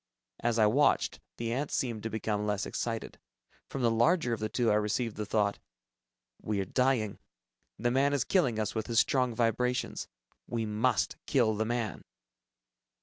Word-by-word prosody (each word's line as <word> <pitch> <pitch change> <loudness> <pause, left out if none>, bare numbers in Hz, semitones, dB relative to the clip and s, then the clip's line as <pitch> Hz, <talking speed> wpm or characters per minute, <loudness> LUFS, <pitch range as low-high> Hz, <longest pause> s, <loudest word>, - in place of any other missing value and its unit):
As 120 -1 0
I 110 - +5
watched, 135 +8 +3 0.2
the 115 0 -2
ants 140 +3 -2
seemed 115 -4 -1
to 115 - -3
become 105 -1 -2
less 105 -1 0
excited. 115 -1 -4 0.5
From 135 - -4
the 115 - +4
larger 120 +3 +3
of 115 - -2
the 110 0 -2
two, 120 -2 +1
I - - +4
received 105 +2 0
the 105 -1 -4
thought, 105 -2 +1 0.8
"We 105 -2 -1
are 95 - -1
dying. 125 -1 +1 0.6
The 120 +1 0
man 135 +3 +3
is 145 -2 +1
killing 135 - +2
us 110 -1 -1
with 110 -1 -3
his 115 -2 +3
strong 125 -3 +2
vibrations. 125 +2 0 0.4
We 115 -2 -2
must 110 +4 +1
kill 120 -6 +3
the 110 +1 0
man." 120 -2 -2
115 Hz, 170 wpm, -30 LUFS, 110-125 Hz, 0.8 s, I